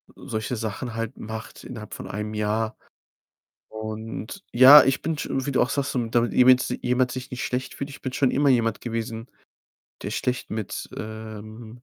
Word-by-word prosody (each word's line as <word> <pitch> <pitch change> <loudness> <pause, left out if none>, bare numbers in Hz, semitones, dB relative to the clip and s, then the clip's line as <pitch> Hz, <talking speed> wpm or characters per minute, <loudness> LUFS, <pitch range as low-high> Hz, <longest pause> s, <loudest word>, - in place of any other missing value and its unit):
solche 110 +3 -4
Sachen 110 +2 -4
halt 115 -1 -4
macht 110 +1 -8
innerhalb 110 -4 -8
von - - -7
1 105 +1 -4
Jahr. 110 +1 -1 0.9
Und 110 - -6
ja, 130 +4 +10
ich 135 0 +1
bin 165 -1 -2
sch 155 - -4
wie 135 +1 -1
du 130 - +3
auch 125 - 0
sagst, 140 -1 -1
so 125 -2 0
damit 120 +1 +1
jemand 125 0 +6
jemand 125 0 +1
sich 130 0 -6
nicht 125 - -4
schlecht 125 +1 -3
fühlt. 140 - -5
Ich 140 - -11
bin 130 - -3
schon 130 0 +2
immer 145 +1 +3
jemand 115 -4 +2
gewesen, 115 0 -4 0.7
der - - -4
schlecht 125 0 -2
mit, 110 -2 -4
ähm, 110 +2 -8
120 Hz, 180 wpm, -25 LUFS, 110-130 Hz, 0.9 s, ja